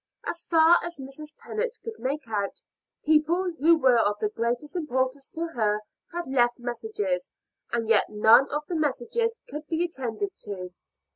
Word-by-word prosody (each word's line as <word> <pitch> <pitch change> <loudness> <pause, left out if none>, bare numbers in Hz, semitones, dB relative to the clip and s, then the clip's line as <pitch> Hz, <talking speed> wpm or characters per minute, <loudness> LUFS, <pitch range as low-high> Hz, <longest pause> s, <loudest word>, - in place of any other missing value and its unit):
As 340 - -4
far 330 0 +6
as 345 -2 -4
Mrs. 275 +3 -8
Tennant 465 +2 -3
could 450 -1 -7
make 270 0 -3
out, 205 -3 -2 0.5
people 320 +4 +3
who 330 +4 +6
were 255 -5 +4
of 205 -2 +2
the 210 - 0
greatest 240 - -2
importance 265 -4 -1
to 325 - -7
her 210 -2 +1 0.3
had 345 0 -4
left 240 -2 +2
messages, 215 -7 -2 0.4
and 230 -1 -1
yet 220 -2 +4
none 220 +5 +6
of 300 +1 -2
the - - -4
messages 330 - 0
could 300 +2 -7
be 330 +2 0
attended 270 - -4
to. 185 -3 -5
270 Hz, 160 wpm, -26 LUFS, 230-330 Hz, 0.5 s, far